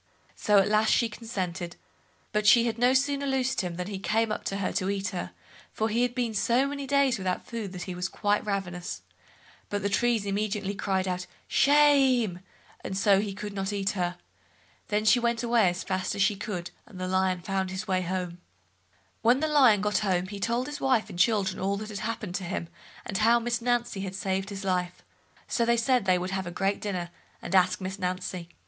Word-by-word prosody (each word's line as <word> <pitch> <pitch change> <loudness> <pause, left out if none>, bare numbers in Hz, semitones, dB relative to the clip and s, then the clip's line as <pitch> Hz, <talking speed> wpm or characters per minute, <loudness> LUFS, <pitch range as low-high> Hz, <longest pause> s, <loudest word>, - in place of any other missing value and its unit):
So 210 -1 +3
at 195 - +5
last 215 +1 +3
she 235 - +3
consented; 185 -6 -5 0.6
but 210 0 0
she 235 +2 +7
had 230 -1 -2
no 245 +1 +5
sooner 280 +1 +1
loosed 265 -1 0
him, 180 -2 -4
than 180 +1 -4
he 195 0 -5
came 220 +2 +1
up - - -3
to 195 - -2
her 200 - -1
to 185 - -1
eat 200 0 -1
her, 180 -3 -4 0.4
for 220 +1 0
he 230 +3 +1
had 245 -1 0
been 240 -3 -1
so 235 +5 +2
many 280 -1 -4
days 275 -4 +2
without 185 -1 -2
food 225 -5 -5
that 180 -1 -5
he 185 - -5
was 180 +1 -3
quite 205 0 0
ravenous, 180 -4 -4 0.7
but 205 -1 -2
the 200 - +1
trees 230 0 +1
immediately 200 0 -1
cried 190 -1 -1
out 180 -1 -3 0.2
"shame", 270 -9 +4 0.4
and 190 - -4
so 195 0 +4
he 200 -2 -4
could 205 0 -6
not 195 0 -2
eat 200 -1 0
her. 180 -2 -2 0.7
Then 210 +1 0
she 245 +3 +6
went 235 0 0
away 235 -5 +4
as 175 +1 -4
fast 185 -1 -2
as 200 - +2
she 205 +1 +2
could, 190 -4 -5 0.2
and 190 -5 -12
the 185 - -2
Lion 185 -1 +1
found 190 +1 -2
his 190 +3 -5
way 185 -1 +1
home. 180 -1 -3 0.8
When 245 +3 +4
Lion 280 -9 +5
got 210 0 +1
home 185 -4 0
he 200 0 -6
told 235 +4 0
his 295 +1 -6
wife 255 -5 +1
and 175 - -8
children 195 -2 +2
all 200 +1 0
that 215 0 -7
happened 215 -4 -4
to 195 - -6
him, 175 -2 -4 0.4
and 195 - -3
how 230 +2 +5
Miss 235 0 -1
Nancy 240 -4 0
had 190 -1 -5
saved 190 0 -2
his 200 -1 -6
life, 180 -2 -2 0.4
so 235 - +1
they 235 0 +3
said 245 -1 +2
they 185 -1 +4
would 180 +1 -3
have 190 -1 -2
a - - -3
great 195 +3 -1
dinner, 180 -4 -3 0.3
and 170 - -6
ask 185 -1 +4
Miss 190 +1 -5
Nancy. 180 -1 -3
200 Hz, 210 wpm, -27 LUFS, 185-235 Hz, 0.8 s, she